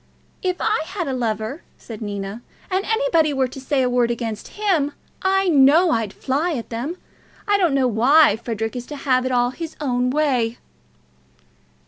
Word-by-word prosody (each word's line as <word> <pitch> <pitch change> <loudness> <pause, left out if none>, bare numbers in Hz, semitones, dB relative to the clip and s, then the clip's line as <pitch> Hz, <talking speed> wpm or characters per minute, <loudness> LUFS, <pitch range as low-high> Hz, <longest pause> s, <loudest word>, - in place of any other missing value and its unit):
"If 365 -1 0
I 435 -4 +1
had 365 -3 -4
a 270 - -2
lover," 230 +4 -2 0.2
said 225 -2 -10
Nina, 205 +1 -5 0.3
"and 380 +1 +1
anybody 440 -10 +2
were 265 -1 +1
to 260 +2 -10
say 270 0 +1
a - - +2
word 245 -1 +2
against 230 - -5
him, 335 -9 +1 0.3
I 385 0 +2
know 315 +3 +5
I'd 225 -7 0
fly 290 +10 -1
at 240 -5 -5
them. 260 +10 -4 0.5
I 410 -1 +3
don't 340 -7 +2
know 265 -2 +3
why 250 +3 +5
Frederic 225 0 -4
is 245 -1 -6
to 295 - -7
have 255 -2 +1
it - - -2
all 245 0 +2
his 325 +4 -7
own 250 -3 0
way." 255 -5 +1
265 Hz, 175 wpm, -21 LUFS, 235-325 Hz, 0.5 s, know